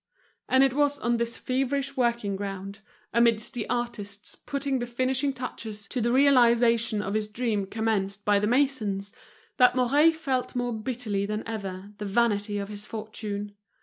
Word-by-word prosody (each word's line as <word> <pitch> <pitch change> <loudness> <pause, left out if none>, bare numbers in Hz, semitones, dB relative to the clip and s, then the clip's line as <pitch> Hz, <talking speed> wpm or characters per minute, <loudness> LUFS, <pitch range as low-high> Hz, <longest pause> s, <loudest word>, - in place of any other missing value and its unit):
And 260 +1 +5
it 270 -2 +3
was 290 0 +2
on 235 0 0
this 235 0 -2
feverish 270 +2 -1
working 235 -5 0
ground, 195 0 -5 0.3
amidst 230 0 +3
the 240 -4 -4
artists 210 -4 -3
putting 280 -1 -2
the 240 - -3
finishing 260 +3 0
touches 220 -5 -6
to 250 - -2
the 235 +1 +1
realization 235 -5 +4
of 195 - -3
his 215 0 0
dream 210 -2 -1
commenced 205 -2 -1
by 205 -1 +4
the 210 - 0
masons, 220 -6 0 0.4
that 250 0 +6
Mouret 285 +6 +4
felt 270 -5 -2
more 245 -1 -1
bitterly 220 -3 -2
than 215 +1 -3
ever 200 -3 -5
the 210 - -4
vanity 205 -1 +1
of 200 0 -4
his 205 0 -6
fortune. 210 -2 -5
230 Hz, 160 wpm, -27 LUFS, 205-255 Hz, 0.4 s, that